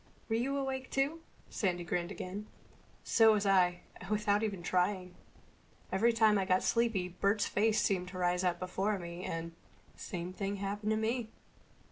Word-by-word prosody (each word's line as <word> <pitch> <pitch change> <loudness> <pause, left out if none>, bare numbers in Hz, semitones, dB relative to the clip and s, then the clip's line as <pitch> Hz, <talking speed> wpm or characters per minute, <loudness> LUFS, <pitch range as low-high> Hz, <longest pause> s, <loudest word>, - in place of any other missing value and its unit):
"Were 225 - +1
you 265 +5 0
awake 265 -1 -3
too?" 285 +5 0 0.3
Sandy 180 -5 -1
grinned 175 0 -2
again. 200 +3 -6 0.6
"So 225 -1 +5
was 205 -1 0
I—and 180 -1 +1
without 210 -1 +2
even 200 -5 -2
trying. 180 0 0 0.8
Every 225 +5 +3
time 220 -2 +4
I 190 - 0
got 185 0 +2
sleepy 225 -6 +1
Bert's 200 +4 +1
face 220 +1 +2
seemed 185 -3 0
to 185 0 -8
rise 180 0 +1
up 180 -1 +1
before 195 +3 -1
me 170 0 -7
and—" 165 0 -4 0.4
"Same 175 0 -5
thing 195 +1 -3
happened 200 +2 -3
to 220 - +2
me." 225 +1 -1
200 Hz, 160 wpm, -33 LUFS, 180-220 Hz, 0.8 s, So